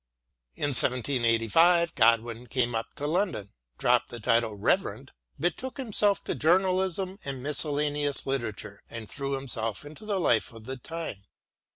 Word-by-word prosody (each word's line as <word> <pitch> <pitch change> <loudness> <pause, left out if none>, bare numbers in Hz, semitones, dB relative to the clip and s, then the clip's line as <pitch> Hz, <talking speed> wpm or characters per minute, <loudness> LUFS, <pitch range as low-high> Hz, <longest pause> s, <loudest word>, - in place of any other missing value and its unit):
In 145 - -1
1785 125 +7 +4
Godwin 115 0 +2
came 120 0 0
up 115 0 -2
to 145 - -5
London, 155 - -1 0.3
dropped - - +2
the 120 - -8
title 115 0 +1
of - - -14
Reverend, - - 0 0.3
betook 235 - -2
himself 210 -5 +1
to - - -2
journalism 185 +2 +1
and 135 -2 -5
miscellaneous 145 0 +2
literature, 115 -6 -4
and 115 -2 -8
threw 140 +3 -4
himself 115 -5 -4
into 155 +9 -11
the 200 -3 0
life 115 -10 +2
of 115 -1 -12
the 130 +2 -5
time. 160 -8 -7
135 Hz, 145 wpm, -27 LUFS, 115-170 Hz, 0.3 s, 1785